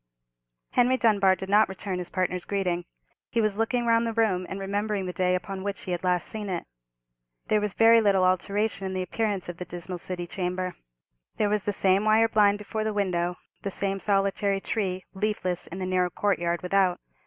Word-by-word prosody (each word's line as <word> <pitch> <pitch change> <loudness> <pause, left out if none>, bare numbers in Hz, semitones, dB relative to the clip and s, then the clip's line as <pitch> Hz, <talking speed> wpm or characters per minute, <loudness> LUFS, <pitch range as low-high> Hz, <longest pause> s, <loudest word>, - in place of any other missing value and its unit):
Henry 250 +1 +3
Dunbar 200 -5 +4
did 190 - -7
not 210 +1 +5
return 190 -1 -4
his 180 - -4
partner's 180 -1 -1
greeting. 180 -3 -1 0.4
He 235 - 0
was 215 -2 +1
looking 235 +2 0
round 230 0 +3
the 230 - -2
room, 200 -5 +1
and 195 - -5
remembering 200 0 -2
the 180 - -4
day 180 0 +2
upon 190 +1 -4
which 200 0 -3
he 185 - -5
had 175 0 -2
last 180 -1 +1
seen 210 -2 -5
it. 175 -2 -3 0.8
There 215 - +3
was 210 -2 -1
very 230 0 +6
little 195 -3 +3
alteration 195 +2 0
in 190 - -4
the 185 - -1
appearance 205 0 -2
of 175 -1 -6
the 180 - -5
dismal 175 +1 -5
city 175 0 -5
chamber. 180 0 -3 0.6
There 210 - +2
was 210 -1 0
the 205 - +1
same 195 0 +2
wire 220 +1 +5
blind 205 -2 +4
before 215 +1 -4
the 215 -1 -2
window, 180 -3 0 0.3
the 200 - -3
same 195 0 -2
solitary 195 0 +1
tree, 190 -3 -2
leafless, 190 -3 -1
in 180 - -7
the 190 - -3
narrow 185 -1 +1
courtyard 175 -2 0
without. 185 -1 +2
195 Hz, 200 wpm, -26 LUFS, 180-210 Hz, 0.8 s, very